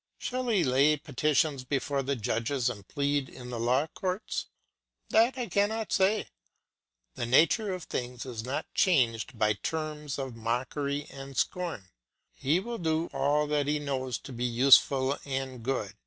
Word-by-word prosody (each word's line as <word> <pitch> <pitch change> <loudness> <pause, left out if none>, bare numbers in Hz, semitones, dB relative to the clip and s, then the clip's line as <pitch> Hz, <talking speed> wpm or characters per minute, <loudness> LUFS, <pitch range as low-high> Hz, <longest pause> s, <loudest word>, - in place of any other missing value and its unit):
Shall 255 0 -3
he 210 -7 +3
lay 140 +4 +4
petitions 145 0 0
before 140 +1 -1
the 140 +1 -1
judges 120 +2 0
and 100 -4 -11
plead 140 -2 0
in 125 -1 -10
the 120 - -4
law 125 +5 +2
courts? 185 +5 -3 0.6
That 235 +4 +4
I 250 - -1
cannot 220 +1 0
say. 200 +3 +3 0.9
The 120 - -3
nature 170 - +4
of 185 -2 -4
things 125 -3 -4
is 120 -4 -5
not 130 +3 -3
changed 125 - +2
by 105 -1 +3
terms 150 +5 -4
of 135 -3 -4
mockery 135 +5 -2
and 135 -1 -9
scorn. 165 - -2 0.4
He 150 +6 +1
will 235 +4 -5
do 160 0 0
all 145 +2 +2
that 145 -1 +1
he 150 +1 +2
knows 130 -4 -2
to 135 - -10
be 120 0 -4
useful 130 +2 +5
and 135 -2 -4
good. 115 -5 -2
140 Hz, 155 wpm, -29 LUFS, 125-160 Hz, 0.9 s, useful